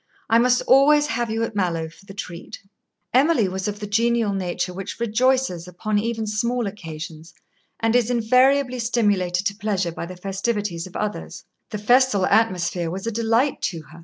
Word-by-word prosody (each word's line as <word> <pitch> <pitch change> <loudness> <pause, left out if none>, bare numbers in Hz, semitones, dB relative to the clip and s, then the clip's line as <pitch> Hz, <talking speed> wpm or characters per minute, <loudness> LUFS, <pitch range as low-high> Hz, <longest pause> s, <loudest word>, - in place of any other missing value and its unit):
I 230 - +6
must 250 +1 +3
always 290 +3 +5
have 235 -3 -2
you 225 +1 -1
at 225 -2 -4
Mallowe 170 -5 -1
for 170 +5 -18
the 195 - -10
treat." 180 -2 -8 0.5
Emily 265 - +4
was 190 +1 -3
of 205 0 -4
the 210 - -5
genial 225 0 +1
nature 180 -1 -2
which 195 +4 -7
rejoices 235 -5 +1
upon 205 +4 -1
even 225 0 -2
small 235 +3 -1
occasions, 165 -4 -8 0.4
and 225 +1 +1
is 245 -2 +3
invariably 255 +2 +3
stimulated 205 -6 +1
to 200 -1 0
pleasure 200 -4 -1
by 170 - -6
the 180 0 -9
festivities 195 -2 -3
of 185 - -16
others. 210 0 -4 0.3
The 210 - -4
festal 230 -2 +3
atmosphere 180 -6 +1
was 190 +4 -5
a 230 - -1
delight 230 +5 +1
to 165 -4 -3
her. 170 - -13
210 Hz, 175 wpm, -22 LUFS, 185-235 Hz, 0.5 s, I